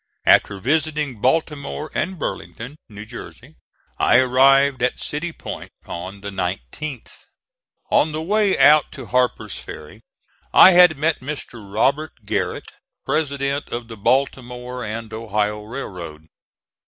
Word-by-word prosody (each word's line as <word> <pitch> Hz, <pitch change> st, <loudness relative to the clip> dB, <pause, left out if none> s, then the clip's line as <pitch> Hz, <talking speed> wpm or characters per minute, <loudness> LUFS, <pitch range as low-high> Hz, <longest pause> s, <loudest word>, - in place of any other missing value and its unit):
After 100 Hz, -, +4 dB
visiting 150 Hz, 0 st, -1 dB
Baltimore 150 Hz, +1 st, -1 dB
and 190 Hz, +1 st, -2 dB
Burlington, 135 Hz, -2 st, -6 dB
New 105 Hz, 0 st, -9 dB
Jersey, 125 Hz, +5 st, -11 dB, 0.4 s
I 120 Hz, -, +5 dB
arrived 135 Hz, +1 st, +4 dB
at 125 Hz, 0 st, 0 dB
City 165 Hz, +4 st, -3 dB
Point -, -, -8 dB, 0.2 s
on 95 Hz, +3 st, -7 dB
the 100 Hz, 0 st, -6 dB
19th. 95 Hz, -, -5 dB, 0.7 s
On 155 Hz, -, +3 dB
the 155 Hz, -, -3 dB
way 205 Hz, +4 st, +1 dB
out 150 Hz, 0 st, +6 dB
to 130 Hz, -, -8 dB
Harper's 120 Hz, -4 st, 0 dB
Ferry -, -, -10 dB, 0.5 s
I 190 Hz, -, +10 dB
had 180 Hz, -4 st, +6 dB
met 155 Hz, +2 st, +1 dB
Mr. 125 Hz, -7 st, -7 dB
Robert 140 Hz, +9 st, 0 dB
Garrett, -, -, -2 dB, 0.3 s
President 140 Hz, -1 st, -1 dB
of 120 Hz, 0 st, -5 dB
the 115 Hz, -, -7 dB
Baltimore 125 Hz, +1 st, -1 dB
and 110 Hz, +1 st, -5 dB
Ohio 105 Hz, -1 st, -1 dB
Railroad. 90 Hz, -, -7 dB
130 Hz, 125 wpm, -21 LUFS, 110-150 Hz, 0.7 s, I